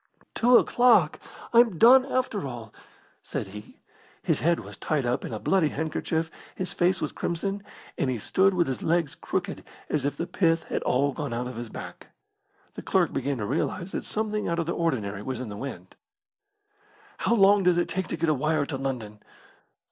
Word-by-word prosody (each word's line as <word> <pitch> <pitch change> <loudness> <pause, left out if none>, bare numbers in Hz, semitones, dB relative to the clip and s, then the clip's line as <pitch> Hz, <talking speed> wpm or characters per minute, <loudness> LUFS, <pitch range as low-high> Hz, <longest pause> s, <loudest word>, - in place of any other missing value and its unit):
"Two 245 +1 +5
o'clock! 230 -11 +4 0.3
I'm 230 -6 +5
done 255 - +7
after 250 - -1
all!" 120 -4 -8 0.5
said - - -4
he. 105 +2 -11 0.5
His - - +1
head 170 +5 +2
was - - -10
tied 150 -5 -1
up 120 +1 0
in - - -5
a 110 - -3
bloody 185 - +2
handkerchief, 160 +2 -2 0.2
his 185 -1 -4
face 180 +1 +2
was - - -2
crimson, 195 +4 -3 0.4
and 135 - +1
he 125 - -1
stood 190 - +2
with 175 -1 +3
his 130 - -4
legs 165 -3 +1
crooked - - -4 0.3
as 150 -3 0
if 145 0 -2
the 170 - -2
pith 165 -2 +1
had - - -3
all 140 +3 +1
gone 120 - -4
out 120 +1 -2
of 125 0 -6
his 120 0 -6
back. - - -9 0.7
The - - -7
clerk - - +1
began 135 +1 -1
to 105 - -3
realise 170 - -2
that - - -3
something 215 -1 -2
out 170 - -1
of 170 - 0
the 170 - -2
ordinary 110 -12 -1
was 130 +4 -4
in 125 -3 -5
the 105 - -6
wind. 100 -8 -7 1.3
"How 235 - +2
long 200 -1 +6
does 180 -2 +3
it 175 - +1
take 190 -1 -3
to - - -4
get 165 +1 0
a 155 - +4
wire 150 +1 0
to 140 -2 -4
London?" 120 -6 -4
160 Hz, 195 wpm, -26 LUFS, 130-190 Hz, 1.3 s, done